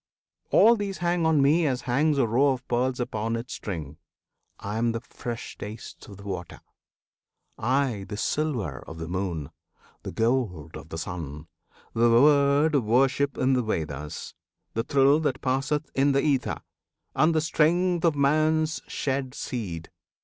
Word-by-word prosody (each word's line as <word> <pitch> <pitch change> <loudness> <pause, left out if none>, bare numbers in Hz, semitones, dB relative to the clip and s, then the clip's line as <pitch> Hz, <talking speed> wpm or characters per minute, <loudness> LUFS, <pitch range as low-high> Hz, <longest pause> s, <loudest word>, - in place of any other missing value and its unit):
All 230 +1 +6
these 200 -3 -4
hang 175 -1 +1
on 155 -3 +4
me 155 +3 +4
As 130 -2 -1
hangs 145 +5 +1
a 135 - +3
row 135 +5 +3
of 125 -1 -8
pearls 125 +1 0
upon 115 -1 -2
its 115 +2 -5
string. 80 -7 -6 0.6
I 105 +2 -4
am 115 0 +1
the 115 - -2
fresh 120 +1 -7
taste 105 +2 -9
of 100 - -11
the 100 - -12
water; 90 -4 -6 1.0
I 125 -5 0
The 105 - -5
silver 115 - -1
of 80 - -8
the 80 0 -5
moon, 85 -5 -3 0.5
the - - -6
gold 110 - -1
o' - - -7
the 80 +1 -7
sun, 80 -4 -6 0.5
The 115 +1 +4
word 140 +4 +5
of 140 -4 +3
worship 135 +5 +2
in 130 +1 +2
the 125 - +2
Veds, 75 -8 -4 0.4
the 115 - 0
thrill 140 +4 +4
That 145 -5 -1
passeth 135 +3 -1
in 140 +1 +3
the 140 - +2
ether, 140 -4 0 0.5
and 160 +1 +3
the - - +4
strength 170 +3 +2
Of 165 -3 +3
man's 155 +2 +2
shed 135 -2 -2
seed. 90 -10 -5
130 Hz, 160 wpm, -26 LUFS, 105-145 Hz, 1.0 s, All